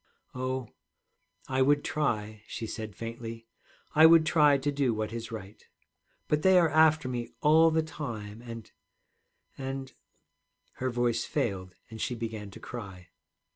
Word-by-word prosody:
'Oh, 130 -1 -3 0.8
I 130 0 0
would 145 +2 +4
try,' 110 -8 -2
she 115 - -5
said 110 -3 -6
faintly; 115 0 -7 0.5
'I 160 +1 +8
would 165 -1 +6
try 150 -3 +5
to 140 +2 -1
do 135 -5 +1
what 110 0 -3
is 115 -1 -6
right. 105 -2 -9 0.6
But 150 0 +1
they 190 +1 +6
are 170 -2 +5
after 155 -2 +4
me 120 -2 -3
all 160 +2 +6
the 160 0 +1
time 115 -9 -6
and 115 -2 -9 0.9
and 135 0 -5 0.4
' - - -46
Her 130 - 0
voice 120 -1 0
failed, 95 -10 -2 0.2
and 110 - -7
she 125 - -1
began 110 -3 -5
to 100 - -12
cry. 95 -7 -9
120 Hz, 150 wpm, -29 LUFS, 110-145 Hz, 0.9 s, I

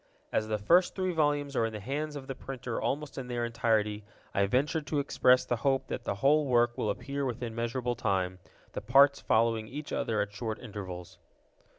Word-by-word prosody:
As 110 - 0
the 110 -1 0
first 170 - +3
three 185 -1 0
volumes 145 -3 0
are 115 - +2
in 110 - -7
the 105 - -5
hands 145 +7 -3
of 140 -2 -6
the 135 - -4
printer 125 -2 -5
almost 145 -1 -2
in 130 - -6
their 120 -1 -1
entirety, 110 -3 0 0.3
I 100 0 +2
venture 140 - +1
to 150 0 -3
express 130 -2 +3
the 120 - 0
hope 135 +2 0
that 120 - -4
the - - -1
whole 145 +7 +3
work 120 -1 +3
will 105 - -1
appear 140 +7 -3
within 120 -3 -3
measurable 120 +2 -1
time, 95 -5 -1 0.3
the - - -5
parts 140 +5 +5
following 110 -1 +2
each 145 +5 -7
other 110 -2 0
at 100 0 -1
short 110 +1 -3
intervals. 95 -6 -8
120 Hz, 200 wpm, -30 LUFS, 110-140 Hz, 0.3 s, parts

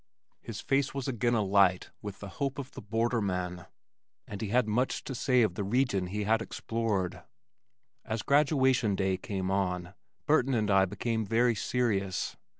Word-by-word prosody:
His 110 -3 -7
face 140 0 0
was 135 -1 -3
again 120 -2 +1
alight 100 -3 +3
with 105 -2 -7
the 100 - -6
hope 140 -1 0
of 140 -1 -6
the - - -9
borderman, 100 -5 -1 0.6
and 100 - -7
he 110 - -2
had 120 +2 +2
much 120 +5 0
to - - -5
say 125 -1 +3
of 105 -5 +1
the 100 - -3
region 100 -3 +1
he 105 +3 -3
had 110 +2 +2
explored. 110 -5 -2 0.8
As 110 -1 -3
graduation 130 -7 +3
day 95 -1 +1
came 95 -1 -3
on, 90 -2 -1 0.3
Burton 135 -4 +3
and 105 -3 +1
I 95 -1 +5
became 110 +4 -2
very 115 +3 +2
serious. 105 -4 -1
110 Hz, 160 wpm, -30 LUFS, 95-125 Hz, 0.8 s, I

